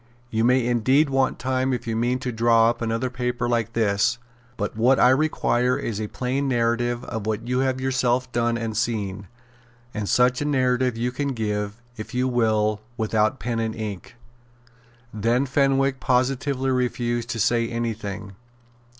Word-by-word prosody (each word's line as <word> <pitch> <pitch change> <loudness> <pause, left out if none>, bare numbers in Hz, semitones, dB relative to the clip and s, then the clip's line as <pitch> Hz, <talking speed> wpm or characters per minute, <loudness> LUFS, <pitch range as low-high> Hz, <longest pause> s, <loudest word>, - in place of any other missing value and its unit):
You 110 -1 +1
may 125 0 +3
indeed 130 +5 +2
want 135 -1 +1
time 130 0 0
if 120 -1 -3
you 115 -1 -2
mean 120 +3 +1
to 125 - -2
draw 115 0 +4
up 120 - -9
another 115 +2 -1
paper 125 0 -2
like 115 -1 0
this. 105 +1 +1 0.4
But 105 -1 -3
what 125 +4 +3
I 125 - +6
require 130 -3 +2
is 110 -2 -3
a 105 - -2
plain 130 +5 -2
narrative 120 0 0
of 110 -2 -5
what 110 +2 -2
you 125 +1 0
have 130 -1 0
yourself 130 -1 0
done 120 0 0
and 115 -2 -4
seen; 105 -4 -2 0.7
and 105 -2 -3
such 125 +1 +3
a - - -1
narrative 130 -3 +1
you 120 +2 -1
can 140 +2 -2
give, 105 0 -3
if 110 +3 -7
you 125 +1 +1
will, 110 -3 +1 0.2
without 110 +1 +1
pen 120 -2 -2
and 110 -1 -2
ink." 105 -2 -6 1.0
Then 115 +5 +1
Fenwick 135 0 +1
positively 130 +1 0
refused 120 -2 -1
to 115 - -3
say 115 +1 +2
any 115 -1 -2
thing. 100 -2 -7
120 Hz, 165 wpm, -24 LUFS, 110-130 Hz, 1.0 s, I